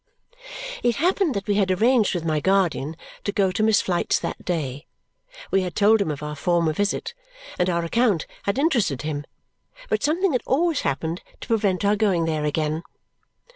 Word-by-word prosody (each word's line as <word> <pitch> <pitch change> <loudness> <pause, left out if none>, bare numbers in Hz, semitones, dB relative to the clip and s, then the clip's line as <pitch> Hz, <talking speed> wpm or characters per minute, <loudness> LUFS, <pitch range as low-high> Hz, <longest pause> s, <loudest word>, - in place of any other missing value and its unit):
It 240 -2 +2
happened 355 -1 +1
that 200 0 -3
we 205 - +1
had 200 -2 +2
arranged 220 +2 +3
with 170 -2 -3
my 155 -2 +1
guardian 170 -4 +1 0.3
to 205 - -1
go 195 -2 +2
to 195 - -2
Miss 215 -1 +4
Flite's 175 -2 +1
that - - -5
day. 145 -5 -3 0.6
We 195 - +3
had 180 -2 -4
told 215 +1 +4
him 195 - 0
of 150 0 -4
our 150 0 -4
former 165 +2 +1
visit, 205 - -1 0.5
and 180 +1 +2
our 170 -1 0
account 210 -2 +2 0.2
had 200 - 0
interested 240 - +1
him; 145 -1 -3 0.6
but 440 -3 +1
something 345 +5 +1
had 250 - +1
always 325 +4 +2
happened 160 +5 -2 0.2
to - - -8
prevent 205 -5 +1
our 205 +1 +4
going 195 -6 +2
there 155 -2 -1
again. 155 +1 -1
190 Hz, 180 wpm, -23 LUFS, 160-220 Hz, 0.6 s, Miss